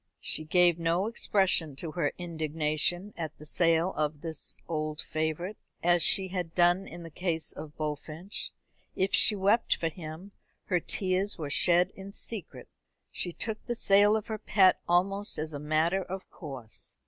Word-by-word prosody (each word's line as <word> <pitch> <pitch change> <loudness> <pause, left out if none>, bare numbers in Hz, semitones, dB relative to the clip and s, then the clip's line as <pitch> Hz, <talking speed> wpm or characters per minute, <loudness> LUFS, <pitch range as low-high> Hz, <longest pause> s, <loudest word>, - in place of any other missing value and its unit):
She 155 - 0
gave 175 +1 +4
no 170 +3 +1
expression 190 - +1
to 155 +3 -6
her 155 -2 0
indignation 165 +3 -1
at 160 -2 -6
the 150 - -12
sale 165 +3 +2
of 150 -1 -2
this 160 -2 -5
old 155 -1 -3
favourite, 160 +6 -3 0.3
as 175 0 +4
she 190 +2 +7
had 180 -3 -4
done 175 +2 +3
in 170 +1 -9
the 165 - -10
case 165 -1 -1
of 150 -1 -10
Bullfinch. 155 +5 -5 0.5
If 190 +1 0
she 215 - +6
wept 205 +4 +2
for 165 - -1
him, 160 +4 -9 0.3
her 180 -3 +1
tears 190 +3 -1
were 150 -4 -5
shed 175 +3 +4
in 195 +1 -10
secret. 220 -3 -6 0.4
She 175 - 0
took 220 +5 -4
the 240 - -1
sale 205 0 +5
of 215 - -5
her 220 -1 -5
pet 190 -3 +4
almost 195 +4 +1
as 155 0 -4
a 145 - -5
matter 155 +5 +1
of 190 +1 -7
course. 130 - -8
175 Hz, 165 wpm, -29 LUFS, 155-190 Hz, 0.5 s, she